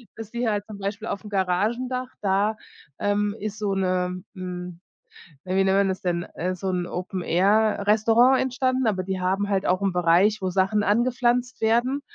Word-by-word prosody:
dass 225 -1 -9
die 240 0 -2
halt 205 -2 -1
zum 210 -2 -9
Beispiel 200 +3 -4
aufm 205 +1 -5
Garagendach 225 +7 -1
da, 200 +2 +1 0.4
ähm, 205 +1 0
ist 215 0 -5
so 205 -2 -1
'ne 185 -1 -1
hm, 180 -1 -6 0.7
äh, 185 +1 -2
wie 195 - +4
nennt 190 0 +2
man 200 -1 +3
das 185 - -3
denn, 175 -1 -1
äh, 185 +2 -2
so 190 +1 -5
'n 180 -1 -1
Open-Air-Restaurant 210 +6 +2
entstanden, 255 -1 0
aber 185 -3 0
die 190 0 -3
haben 195 +3 0
halt 195 -1 0
auch 185 +2 +1
'n 195 -2 0
Bereich, 180 +5 +3
wo 185 - -1
Sachen 195 +3 +1
angepflanzt 245 +3 +1
werden. 240 +5 +2
200 Hz, 175 wpm, -24 LUFS, 185-225 Hz, 0.7 s, wie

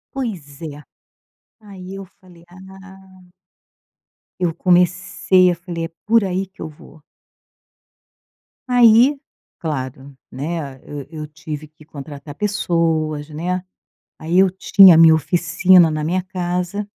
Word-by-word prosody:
Pois 170 - -6
é, 150 -3 -7 0.8
aí 195 -3 -12
eu 195 - -9
falei 175 -2 -19
ah 190 0 -16 1.1
eu 170 -3 0
comecei 180 +1 +2
e - - -3
falei: 170 -1 -6
"É - - -8 0.2
por 225 0 +3
aí 190 0 -2
que 190 +2 -18
eu 160 - -5
vou." 150 0 -17 1.7
Aí, 245 +3 +5 0.4
claro, 135 -3 -6 0.2
né, 140 0 -5
eu 145 -2 -8
eu 155 -2 -8
tive 155 0 -8
que 155 0 -21
contratar 145 -1 -10
pessoas, 165 -7 -1
né, 180 +4 -4 0.6
aí 165 +3 -1
eu 190 0 +5
tinha 190 0 +6
a 160 - +4
minha 165 -1 +7
oficina 175 +2 +3
na 155 0 -3
minha 185 +3 -1
casa. 180 +2 -4
175 Hz, 125 wpm, -19 LUFS, 155-190 Hz, 1.7 s, minha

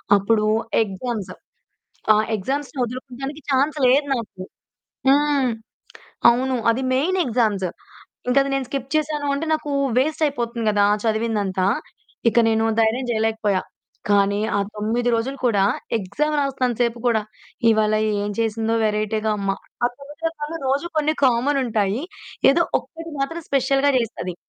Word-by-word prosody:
అప్పుడు 210 +2 +2 0.4
ఎగ్జామ్స్. 205 -1 -4 0.8
ఆ - - +5 0.2
ఎగ్జామ్స్‌ని 275 +7 -4
వదులుకోవడానికి 260 +4 -6
చాన్స్ 285 +3 +2
లేదు 280 +3 +4
నాకు. 215 -6 -6 0.7
హ్మ్. 285 -2 +3 0.8
అవును. 255 +2 0
అది 250 +3 -1
మెయిన్ 360 +8 +1
ఎగ్జామ్స్ 215 -6 +1 0.6
ఇంక 250 - +1
అది 275 - -3
నేను 270 -2 -1
స్కిప్ 275 -1 -4
చేశాను 300 -1 0
అంటే 315 +3 -3
నాకు 310 -2 -1 0.3
వేస్ట్ 305 +4 +1
అయిపోతుంది 235 -5 -2
కదా! 205 -1 +3 0.2
చదివిందంతా. 215 -4 0 0.6
ఇక 235 - +2
నేను 225 0 +2 0.2
ధైర్యం 225 +4 +2
చేయలేకపోయా 220 -3 +1 0.5
కానీ 200 0 +3 0.2
ఆ - - +2 0.2
9 230 +3 0
రోజులు 265 +5 -2
కూడా 210 -5 +3 0.4
ఎగ్జామ్ 280 +11 -1
రాస్తున్నంత 260 -4 0
సేపు 235 0 0
కూడా. 225 -2 +2 0.5
ఇవాళ 215 -1 +2 0.3
ఏం 205 - -2
చేసిందో 225 0 0
వెరైటీగా 215 +1 0
అమ్మ. 195 -1 -1 0.3
ఆ - - +6
9 290 +3 -13
రకాలలో 325 0 -6
రోజు 280 +5 0
కొన్ని 310 +1 +1
కామనుంటాయి. 240 -3 +1 0.5
ఏదో 340 +5 +3 0.2
ఒక్కటి 330 0 -10
మాత్రం 330 +5 -2
స్పెషల్‌గా 275 +1 +2
చేస్తది. 205 -6 -4
245 Hz, 130 wpm, -22 LUFS, 215-280 Hz, 0.8 s, ఆ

